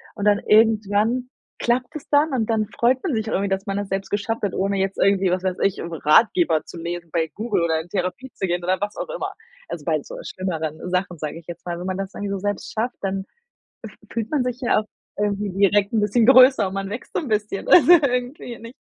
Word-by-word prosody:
und 205 Hz, -, -4 dB
dann 205 Hz, -1 st, +4 dB
irgendwann 220 Hz, +3 st, +2 dB, 0.3 s
klappt 245 Hz, +3 st, 0 dB
es 300 Hz, -, -8 dB
dann. 290 Hz, 0 st, +3 dB
Und 230 Hz, -3 st, 0 dB
dann 220 Hz, -1 st, +1 dB
freut 240 Hz, +4 st, +1 dB
man 350 Hz, -, -1 dB
sich 220 Hz, 0 st, -2 dB
irgendwie, 200 Hz, -2 st, 0 dB
dass 195 Hz, 0 st, -2 dB
man 195 Hz, 0 st, -2 dB
das 205 Hz, -1 st, -3 dB
selbst 195 Hz, 0 st, -3 dB
geschafft 210 Hz, +3 st, -2 dB
hat, 200 Hz, -3 st, -1 dB
ohne 195 Hz, +1 st, 0 dB
jetzt 195 Hz, 0 st, -1 dB
irgendwie, 195 Hz, -1 st, +3 dB
was 185 Hz, 0 st, -1 dB
weiß 185 Hz, -1 st, -1 dB
ich, 195 Hz, -, +1 dB
irgendwo 170 Hz, 0 st, -5 dB
'n -, -, -15 dB
Ratgeber 225 Hz, -, +4 dB
zu -, -, -10 dB
lesen, 170 Hz, 0 st, -5 dB
bei 165 Hz, -2 st, 0 dB
Google 215 Hz, -4 st, -1 dB
oder 160 Hz, -1 st, +1 dB
in 160 Hz, -, -8 dB
Therapie 190 Hz, +8 st, -3 dB
zu 190 Hz, -, -3 dB
gehen 175 Hz, 0 st, -1 dB
oder 185 Hz, +2 st, 0 dB
was 205 Hz, 0 st, -3 dB
auch -, -, -4 dB
immer. -, -, -3 dB, 0.4 s
Also, -, -, -6 dB
bei -, -, +1 dB
so -, -, -9 dB
schlimmeren 160 Hz, -5 st, -4 dB
Sachen, 180 Hz, -1 st, -1 dB
sage 155 Hz, +1 st, -5 dB
ich 170 Hz, -, -18 dB
jetzt 175 Hz, -1 st, -9 dB
mal. 175 Hz, -1 st, -4 dB
Wenn 180 Hz, -, -6 dB
man 185 Hz, 0 st, -2 dB
das 195 Hz, 0 st, -5 dB
irgendwie 205 Hz, -1 st, -4 dB
so 195 Hz, -, -2 dB
selbst 205 Hz, 0 st, -3 dB
schafft, 235 Hz, +3 st, -2 dB
dann 195 Hz, 0 st, -2 dB, 0.6 s
f -, -, -10 dB, 0.2 s
fühlt 225 Hz, -2 st, -3 dB
man 295 Hz, -4 st, +1 dB
sich 250 Hz, 0 st, -3 dB
ja 240 Hz, -, +2 dB
auch -, -, -8 dB, 0.3 s
irgendwie 205 Hz, 0 st, -1 dB
direkt 200 Hz, +1 st, +2 dB
'n 225 Hz, -, +2 dB
bisschen 210 Hz, +2 st, +2 dB
größer 255 Hz, -4 st, +7 dB
und 190 Hz, -, -5 dB
man 195 Hz, 0 st, -3 dB
wächst 225 Hz, +5 st, -7 dB
so -, -, +1 dB
'n 305 Hz, -, -6 dB
bisschen, 210 Hz, -2 st, -2 dB
also, 350 Hz, 0 st, +8 dB
irgendwie, 250 Hz, -5 st, +1 dB
nicht. 230 Hz, +3 st, -11 dB
205 Hz, 245 wpm, -22 LUFS, 185-235 Hz, 0.6 s, also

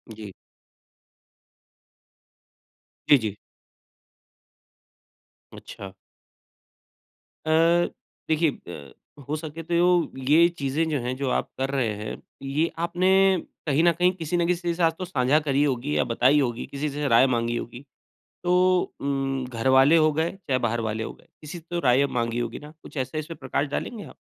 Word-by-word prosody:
जी। 105 Hz, -2 st, -9 dB, 2.8 s
जी, 145 Hz, -, +8 dB
जी। 110 Hz, -5 st, -4 dB, 2.2 s
अच्छा। 95 Hz, -1 st, -10 dB, 1.5 s
अ, 155 Hz, -, -3 dB, 0.8 s
देखिए 160 Hz, 0 st, +2 dB, 0.2 s
ब 70 Hz, -5 st, -9 dB, 0.3 s
हो 150 Hz, -, -1 dB
सके 155 Hz, +1 st, -7 dB
तो 170 Hz, -, -5 dB, 0.6 s
ये 165 Hz, +3 st, +6 dB
चीज़ें 140 Hz, +3 st, 0 dB
जो 150 Hz, -3 st, 0 dB
हैं, 125 Hz, +1 st, -3 dB
जो 135 Hz, -1 st, -2 dB
आप -, -, -1 dB
कर 135 Hz, +1 st, -1 dB
रहे 125 Hz, -6 st, 0 dB
हैं, 105 Hz, +1 st, -7 dB, 0.2 s
ये 140 Hz, +4 st, 0 dB
आपने 175 Hz, +2 st, 0 dB, 0.6 s
कहीं 150 Hz, +2 st, +2 dB
न 170 Hz, -, +6 dB
कहीं 180 Hz, +2 st, +2 dB
किसी 170 Hz, 0 st, -2 dB
न 170 Hz, -, +1 dB
किसी 175 Hz, 0 st, -1 dB
के 170 Hz, -, +1 dB
साथ 165 Hz, -1 st, +2 dB
तो 185 Hz, -, -3 dB
साँझा 140 Hz, -3 st, +2 dB
करी 140 Hz, +1 st, +2 dB
होगी 140 Hz, +1 st, -1 dB
या -, -, +3 dB
बताई 130 Hz, +5 st, +4 dB
होगी। 120 Hz, -3 st, -1 dB
किसी 145 Hz, +2 st, -4 dB
से 145 Hz, +1 st, -3 dB
राय 120 Hz, +1 st, +5 dB
माँगी 120 Hz, -1 st, 0 dB
होगी, 120 Hz, +4 st, -8 dB, 0.6 s
तो 180 Hz, +1 st, +3 dB, 0.2 s
उम, 135 Hz, -1 st, -2 dB
घर 115 Hz, +1 st, -3 dB
वाले 135 Hz, +5 st, +6 dB
हो 155 Hz, -1 st, +4 dB
गए, 160 Hz, +3 st, 0 dB
चाहे 170 Hz, -9 st, -2 dB
बाहर 120 Hz, -1 st, -1 dB
वाले 110 Hz, +1 st, -3 dB
हो -, -, -6 dB
गए। -, -, -23 dB
किसी 155 Hz, +3 st, -8 dB
से 165 Hz, -, -12 dB
तो 175 Hz, -, -2 dB
राय 130 Hz, -3 st, +3 dB
अब 140 Hz, -, -1 dB
माँगी 115 Hz, -1 st, -1 dB
होगी 120 Hz, -1 st, -4 dB
ना? 150 Hz, +1 st, -12 dB
कुछ -, -, -11 dB
ऐसा 130 Hz, +4 st, -3 dB
इसमें 155 Hz, +2 st, -5 dB
प्रकाश 135 Hz, +2 st, -2 dB
डालेंगे 210 Hz, -, -4 dB
आप? -, -, -13 dB
140 Hz, 165 wpm, -25 LUFS, 125-165 Hz, 2.8 s, जी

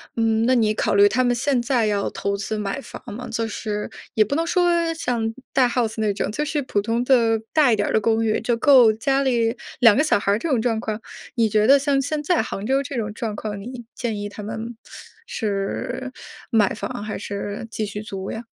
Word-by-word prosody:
嗯， 225 Hz, -1 st, +2 dB
那 255 Hz, +2 st, +4 dB
你 220 Hz, -3 st, +3 dB
考 215 Hz, -, 0 dB
虑 200 Hz, 0 st, +6 dB
他 255 Hz, +3 st, +1 dB
们 245 Hz, 0 st, +2 dB
现 265 Hz, 0 st, +1 dB
在 240 Hz, -2 st, +1 dB
要 205 Hz, -1 st, 0 dB
投 200 Hz, 0 st, -2 dB
资 215 Hz, +2 st, -3 dB
买 210 Hz, +4 st, -3 dB
房 -, -, -10 dB
吗？ 250 Hz, +4 st, -7 dB
就 230 Hz, 0 st, -1 dB
是 210 Hz, -1 st, -4 dB, 0.2 s
也 215 Hz, -, +4 dB
不 215 Hz, -, -4 dB
能 330 Hz, +2 st, 0 dB
说 340 Hz, -1 st, +2 dB
像 235 Hz, -8 st, -2 dB, 0.2 s
大 255 Hz, -2 st, +4 dB
house 235 Hz, -2 st, -1 dB
那 215 Hz, -2 st, +1 dB
种， 200 Hz, -, -2 dB
就 295 Hz, +7 st, -2 dB
是 300 Hz, -1 st, -1 dB
普 210 Hz, -6 st, -1 dB
通 230 Hz, +3 st, -1 dB
的 230 Hz, -4 st, +3 dB
大 285 Hz, -7 st, +4 dB
一 -, -, +4 dB
点 205 Hz, -1 st, 0 dB
儿 -, -, -2 dB
的 220 Hz, -, +4 dB
公 225 Hz, +1 st, +1 dB
寓， 215 Hz, -1 st, +1 dB
就 235 Hz, +2 st, 0 dB
够 240 Hz, -2 st, +6 dB
家 270 Hz, +5 st, +1 dB
里 235 Hz, -2 st, +1 dB, 0.2 s
2 230 Hz, -4 st, +7 dB
个 -, -, +5 dB
小 310 Hz, -, +3 dB
孩 200 Hz, 0 st, 0 dB
儿 205 Hz, -, +2 dB
这 335 Hz, -, -3 dB
种 245 Hz, -5 st, +2 dB
状 225 Hz, -2 st, 0 dB
况。 220 Hz, -1 st, -4 dB, 0.3 s
你 225 Hz, -2 st, +2 dB
觉 215 Hz, +1 st, +3 dB
得 275 Hz, +2 st, +8 dB
像 275 Hz, -1 st, +1 dB
现 295 Hz, +2 st, -2 dB
在 350 Hz, +2 st, +2 dB
杭 210 Hz, -3 st, -5 dB
州 270 Hz, +3 st, +2 dB
这 280 Hz, 0 st, -6 dB
种 215 Hz, -3 st, -2 dB
状 225 Hz, -2 st, -4 dB
况， 205 Hz, -1 st, -5 dB
你 240 Hz, +4 st, -8 dB
建 230 Hz, -4 st, -3 dB
议 205 Hz, 0 st, -4 dB
他 205 Hz, +1 st, -9 dB
们 220 Hz, +2 st, -6 dB, 0.5 s
是 215 Hz, -, -3 dB, 0.4 s
买 220 Hz, -5 st, +3 dB
房 230 Hz, +1 st, -5 dB
还 215 Hz, 0 st, -4 dB
是 205 Hz, +2 st, -5 dB
继 220 Hz, -, -2 dB
续 205 Hz, 0 st, -6 dB
租 195 Hz, -3 st, -6 dB
呀？ 230 Hz, +2 st, -6 dB
225 Hz, 260 characters per minute, -22 LUFS, 210-255 Hz, 0.5 s, 得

